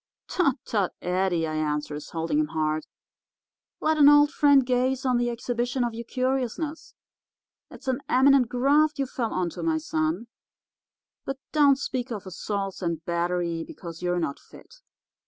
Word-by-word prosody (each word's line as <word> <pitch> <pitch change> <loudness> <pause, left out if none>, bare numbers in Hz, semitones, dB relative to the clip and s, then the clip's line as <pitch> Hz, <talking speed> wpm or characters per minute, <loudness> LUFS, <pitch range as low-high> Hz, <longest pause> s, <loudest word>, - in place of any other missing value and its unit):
"'Tut, 325 -8 +2
tut, 200 -5 0
Eddie,' 180 -2 +1
I 155 - -4
answers, 150 -1 -3
holding 165 - -1
him 305 - +1
hard; 155 - -1 0.9
'let 310 0 +1
an 290 -1 +9
old 290 0 +6
friend 285 -3 +5
gaze 255 +1 0
on 250 -2 +3
the 240 0 +1
exhibition 240 +1 -2
of 240 -1 -2
your 235 +1 -6
curiousness. 265 +5 -2 0.7
It's 265 - -14
an 255 -1 0
eminent 265 -1 +5
graft 290 +5 +3
you 275 - 0
fell 245 -3 -3
onto, 180 -2 -2
my 325 -1 +1
son. 315 -3 -1 1.0
But 270 - -4
don't 285 -3 +5
speak 260 -2 -3
of 210 -4 -5
assaults 195 +1 -4
and 170 -3 -3
battery, 170 -1 -1
because 165 -1 -9
you're 180 0 0
not 160 -5 -2
fit. - - -17
245 Hz, 155 wpm, -26 LUFS, 175-280 Hz, 1.0 s, an